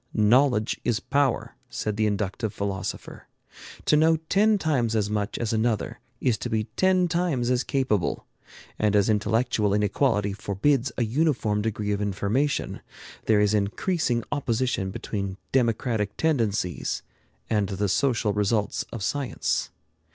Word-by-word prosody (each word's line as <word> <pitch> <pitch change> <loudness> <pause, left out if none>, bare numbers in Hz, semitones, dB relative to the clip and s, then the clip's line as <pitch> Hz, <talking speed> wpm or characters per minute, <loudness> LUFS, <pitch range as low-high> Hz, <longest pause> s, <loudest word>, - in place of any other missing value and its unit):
"Knowledge 115 +1 +3
is 120 -3 +1
power," 140 -2 0 0.2
said 105 -1 -3
the 110 0 +1
inductive 105 +1 -2
philosopher. 100 -2 -5 0.6
To - - +4
know 160 +2 +5
ten 210 +2 +4
times 130 - 0
as 105 -1 0
much 105 0 -2
as 115 -1 -2
another 110 -1 0 0.2
is 120 -4 +1
to 120 - -4
be 110 -2 0
ten 185 -1 +3
times 165 -8 0
as 125 0 +2
capable; 130 - 0 0.5
and 105 -1 +2
as 100 +1 +3
intellectual 105 -1 +1
inequality 105 0 +1
forbids 120 +7 0
a 120 - +2
uniform 120 -4 +1
degree 105 -1 -2
of 100 0 -1
information, 105 +8 -1 0.4
there 105 -2 +4
is 105 0 +3
increasing 120 - 0
opposition 125 -7 0
between 100 0 -4
democratic 115 -4 0
tendencies 110 - 0 0.4
and 105 -3 0
the 100 +1 -1
social 115 -1 +1
results 105 0 0
of 115 -4 -5
science. 140 +3 -1
110 Hz, 135 wpm, -25 LUFS, 105-135 Hz, 0.6 s, know